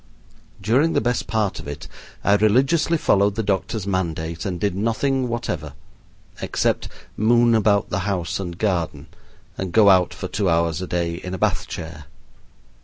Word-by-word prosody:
During 125 +11 +2
the - - +3
best 120 +1 -1
part 110 -3 -1
of - - -9
it 75 0 -7 0.4
I 100 - +4
religiously 135 +11 +3
followed 100 -7 +2
the 110 - -1
doctor's 100 +1 -1
mandate 85 -4 -2
and 90 -2 -3
did 100 -1 0
nothing 125 +5 0
whatever, 90 -11 -4 0.7
except - - 0 0.3
moon 120 +2 +4
about 105 -2 +2
the 90 - 0
house 90 -2 -2
and 90 -3 -5
garden 85 -7 -2 0.5
and 95 -2 -3
go 105 0 +6
out 90 -2 +4
for - - -6
two 100 -2 -1
hours 85 0 +1
a 95 - -4
day 85 -1 -1
in 90 +1 -5
a - - -5
Bath - - 0
chair. 80 -2 -7
100 Hz, 165 wpm, -22 LUFS, 85-110 Hz, 0.7 s, go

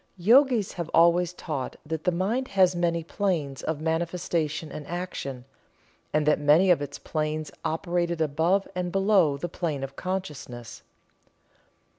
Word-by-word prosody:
The 175 - -14
Yogis 240 -1 +5
have 170 -2 -5
always 170 +1 +5
taught 150 -7 -5
that 160 0 -4
the 180 - +3
mind 210 +9 -1
has 185 -1 +5
many 170 -1 0
planes 160 -7 -2
of 160 -2 -2
manifestation 165 -1 -1
and 150 - -7
action 165 -8 -5 0.7
and 150 0 +1
that 150 0 +3
many 155 +6 +5
of 170 - +3
its 145 0 -5
planes 155 0 -3
operated 170 +1 -1
above 160 +6 +1
and 180 -1 -2
below 195 -7 +3
the 175 - -3
plane 155 -5 -3
of 135 0 -6
consciousness. 150 -11 -5
170 Hz, 145 wpm, -26 LUFS, 150-180 Hz, 0.7 s, Yogis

